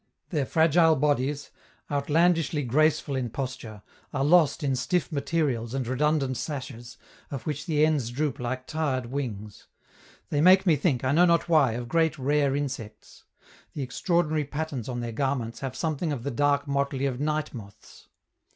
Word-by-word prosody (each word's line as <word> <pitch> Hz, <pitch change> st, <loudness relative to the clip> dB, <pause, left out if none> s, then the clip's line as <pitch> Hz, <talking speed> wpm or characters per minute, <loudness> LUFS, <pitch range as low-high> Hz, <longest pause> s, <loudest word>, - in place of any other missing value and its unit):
Their 145 Hz, -6 st, -1 dB
fragile 160 Hz, 0 st, +4 dB
bodies, 145 Hz, 0 st, 0 dB, 0.4 s
outlandishly 155 Hz, +1 st, +2 dB
graceful 145 Hz, +2 st, +1 dB
in 125 Hz, -2 st, -2 dB
posture, 120 Hz, -4 st, -6 dB, 0.3 s
are 135 Hz, -1 st, 0 dB
lost 165 Hz, 0 st, +4 dB
in 135 Hz, -2 st, +1 dB
stiff 175 Hz, +7 st, -1 dB
materials 140 Hz, -5 st, -1 dB
and 135 Hz, -2 st, -1 dB
redundant 135 Hz, +1 st, 0 dB
sashes, 125 Hz, -3 st, -6 dB, 0.3 s
of 135 Hz, -5 st, -6 dB
which 145 Hz, +1 st, -4 dB
the 155 Hz, -2 st, +3 dB
ends 150 Hz, -7 st, 0 dB
droop 140 Hz, +1 st, -2 dB
like 130 Hz, +1 st, -4 dB
tired 145 Hz, -5 st, -2 dB
wings. 110 Hz, -7 st, -5 dB, 0.6 s
They 145 Hz, -, +1 dB
make 185 Hz, +3 st, +6 dB
me 170 Hz, -4 st, +5 dB
think, 140 Hz, -4 st, 0 dB
I 130 Hz, -, +1 dB
know 170 Hz, +5 st, +5 dB
not 170 Hz, -1 st, +2 dB
why, 150 Hz, -8 st, +4 dB
of 120 Hz, +1 st, -5 dB
great 160 Hz, +2 st, +1 dB
rare 140 Hz, 0 st, +1 dB
insects; 135 Hz, -7 st, -6 dB, 0.5 s
the 145 Hz, -, -3 dB
extraordinary 155 Hz, +3 st, 0 dB
patterns 145 Hz, -4 st, -4 dB
on 120 Hz, -1 st, -3 dB
their 120 Hz, -1 st, -4 dB
garments 120 Hz, -2 st, -2 dB
have 135 Hz, -2 st, -5 dB
something 160 Hz, +1 st, -2 dB
of 130 Hz, -5 st, -4 dB
the 140 Hz, -, -2 dB
dark 145 Hz, +2 st, +1 dB
motley 140 Hz, -1 st, -1 dB
of 130 Hz, -2 st, -2 dB
night 150 Hz, +1 st, -1 dB
moths. 100 Hz, -5 st, -12 dB
140 Hz, 160 wpm, -26 LUFS, 130-155 Hz, 0.6 s, make